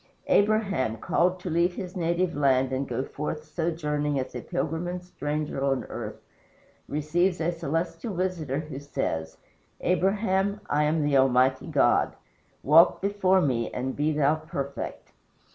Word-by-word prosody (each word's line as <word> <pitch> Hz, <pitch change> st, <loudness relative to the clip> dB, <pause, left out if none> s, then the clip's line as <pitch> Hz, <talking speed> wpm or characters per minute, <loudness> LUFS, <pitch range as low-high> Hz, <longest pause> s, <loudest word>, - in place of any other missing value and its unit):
Abraham, 200 Hz, -, +2 dB
called 180 Hz, +10 st, +1 dB
to 180 Hz, -, -4 dB
leave 170 Hz, +2 st, +2 dB
his 185 Hz, -1 st, -6 dB
native 175 Hz, 0 st, 0 dB
land 135 Hz, -2 st, +2 dB
and 135 Hz, +1 st, -1 dB
go 130 Hz, -, -2 dB
forth 150 Hz, +2 st, -5 dB
sojourning 150 Hz, -3 st, -1 dB
as 130 Hz, -, -4 dB
a -, -, -5 dB
pilgrim 165 Hz, -1 st, -2 dB
and 180 Hz, 0 st, -4 dB
stranger 150 Hz, -4 st, -3 dB
on 135 Hz, -1 st, +1 dB
earth, -, -, -6 dB, 0.7 s
receives 170 Hz, +5 st, 0 dB
a 165 Hz, +1 st, +1 dB
celestial 170 Hz, -, -3 dB
visitor 170 Hz, -6 st, -1 dB
who 150 Hz, -4 st, -7 dB
says: 80 Hz, -, -3 dB, 0.4 s
"Abraham, 195 Hz, +2 st, +1 dB
I 150 Hz, +1 st, +2 dB
am 155 Hz, +1 st, +1 dB
the 145 Hz, -1 st, +3 dB
Almighty 130 Hz, 0 st, +3 dB
God. -, -, +2 dB, 0.5 s
Walk 160 Hz, +4 st, +6 dB
before 190 Hz, -1 st, +2 dB
me 120 Hz, -7 st, 0 dB
and 130 Hz, +1 st, -3 dB
be 150 Hz, +2 st, +1 dB
thou 150 Hz, 0 st, +2 dB
perfect." 140 Hz, -3 st, -6 dB
155 Hz, 145 wpm, -27 LUFS, 140-180 Hz, 0.7 s, Walk